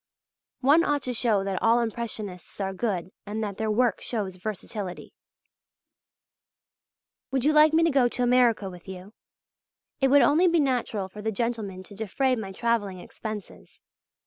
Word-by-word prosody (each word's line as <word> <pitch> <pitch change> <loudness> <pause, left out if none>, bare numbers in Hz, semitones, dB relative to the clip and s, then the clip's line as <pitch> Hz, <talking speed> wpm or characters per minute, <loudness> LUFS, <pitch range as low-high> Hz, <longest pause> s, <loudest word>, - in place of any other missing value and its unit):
One 290 +6 +5
ought 290 -3 0
to 250 - -3
show 220 -4 +1
that 195 -1 -2
all 230 +1 +4
Impressionists 220 -6 -5
are 195 -1 -2
good 190 -4 -2 0.2
and 215 +2 -3
that 200 -2 -4
their 220 0 -1
work 230 0 +2
shows 200 -6 -3
versatility. 200 -1 -6 2.2
Would 265 -1 -1
you 305 - +4
like 305 0 +6
me 325 +1 +4
to 330 - +3
go 270 -3 +4
to 245 +1 -2
America 240 -4 +3
with 180 -1 -11
you? 190 +2 -9 0.9
It 270 - +4
would 280 +1 +6
only 325 +6 +4
be 340 -1 +3
natural 245 -8 0
for 210 +3 -10
the 220 +1 -1
gentlemen 215 -4 -3
to 205 - -14
defray 225 +6 0
my 210 -5 -5
travelling 205 -3 -1
expenses. 215 +2 -9
220 Hz, 160 wpm, -26 LUFS, 195-255 Hz, 2.2 s, like